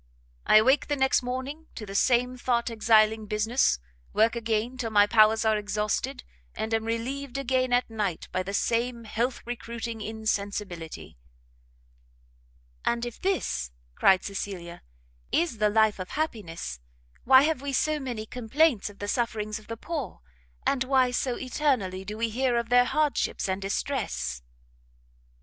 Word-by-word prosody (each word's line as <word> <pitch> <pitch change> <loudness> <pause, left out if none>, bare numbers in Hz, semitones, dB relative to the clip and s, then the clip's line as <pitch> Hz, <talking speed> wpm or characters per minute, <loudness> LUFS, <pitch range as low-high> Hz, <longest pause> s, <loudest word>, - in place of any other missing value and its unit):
I - - +6
awake 260 +6 +5
the 290 - 0
next 265 -1 +3
morning 260 +6 -5
to 215 - -6
the 195 - -8
same 250 +4 +2
thought 240 -1 0
exiling 220 -1 +3
business, 215 - +2 0.4
work 225 +2 +3
again 230 +1 -1
till 240 -3 -3
my 205 -2 +5
powers 220 +1 +4
are 215 -1 +3
exhausted, 210 - -2 0.3
and 220 +1 -3
am 225 0 +1
relieved 250 +4 -3
again 260 -1 0
at 245 0 +3
night 210 -6 -3
by 185 - 0
the 195 +2 -4
same 235 +2 0
health 235 +3 -2
recruiting 235 -1 -5
insensibility." 205 - -4 1.7
"And 235 0 0
if 240 - -8
this," 360 - -1 0.2
cried 190 - +4
Cecilia, 190 -3 -5 0.5
"is 325 -10 0
the 210 0 +4
life 220 -1 +3
of 185 - -5
happiness, 185 - -4 0.4
why 265 +1 +7
have 305 -3 0
we 280 0 -3
so 305 +3 +1
many 245 -6 -4
complaints 250 +1 +1
of 205 - -14
the 205 - -5
sufferings 215 -2 -1
of 215 - -18
the 230 - -5
poor, 290 - -5 0.4
and 260 -2 +2
why 260 -1 +3
so 245 0 -1
eternally 250 -9 -1
do 210 +2 -6
we 230 0 0
hear 245 +2 +1
of 235 -1 -2
their 245 0 +6
hardships 300 -4 0
and 190 +1 -2
distress?" 70 - -2
230 Hz, 150 wpm, -27 LUFS, 210-255 Hz, 1.7 s, why